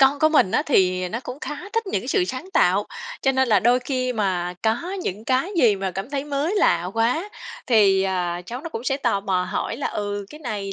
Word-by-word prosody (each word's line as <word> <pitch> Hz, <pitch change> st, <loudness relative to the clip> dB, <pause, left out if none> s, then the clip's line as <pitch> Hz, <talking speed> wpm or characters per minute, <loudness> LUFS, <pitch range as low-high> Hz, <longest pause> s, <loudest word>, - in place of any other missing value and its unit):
con 270 Hz, +1 st, +5 dB
của 310 Hz, -, +4 dB
mình 295 Hz, -12 st, +4 dB
á 295 Hz, -, +2 dB
thì 185 Hz, -7 st, +2 dB
nó 230 Hz, +6 st, -4 dB
cũng 250 Hz, +4 st, -7 dB
khá -, -, -4 dB, 0.2 s
thích 455 Hz, -1 st, 0 dB
những 380 Hz, -, -1 dB
cái -, -, -8 dB
sự 390 Hz, -3 st, +2 dB
sáng 305 Hz, +4 st, -6 dB
tạo, 200 Hz, -, +3 dB, 0.4 s
cho 270 Hz, -, +3 dB
nên 265 Hz, -1 st, +2 dB
là 210 Hz, -, +4 dB
đôi 245 Hz, +2 st, +4 dB
khi 255 Hz, -1 st, -1 dB
mà 185 Hz, -5 st, -1 dB
có 240 Hz, -, 0 dB
những 210 Hz, -, -4 dB
cái 260 Hz, +9 st, +1 dB
gì 215 Hz, -5 st, +5 dB
mà 190 Hz, -1 st, -2 dB
cảm 195 Hz, +7 st, -6 dB
thấy 280 Hz, -1 st, -2 dB
mới 295 Hz, +5 st, -1 dB
lạ 175 Hz, -, +3 dB
quá, 245 Hz, -, +1 dB, 0.4 s
thì, 200 Hz, -5 st, +4 dB
ờ, 180 Hz, -2 st, -1 dB
cháu 245 Hz, +2 st, -5 dB
nó 330 Hz, -, -6 dB
cũng 245 Hz, -6 st, -6 dB
sẽ 270 Hz, -, +1 dB
tò 235 Hz, -7 st, 0 dB
mò 185 Hz, -2 st, 0 dB
hỏi 230 Hz, -, -2 dB
là 280 Hz, -, -2 dB
"Ừ, 205 Hz, -1 st, -3 dB
cái 300 Hz, -, -10 dB
này 205 Hz, -7 st, -4 dB
235 Hz, 240 wpm, -23 LUFS, 195-275 Hz, 0.4 s, con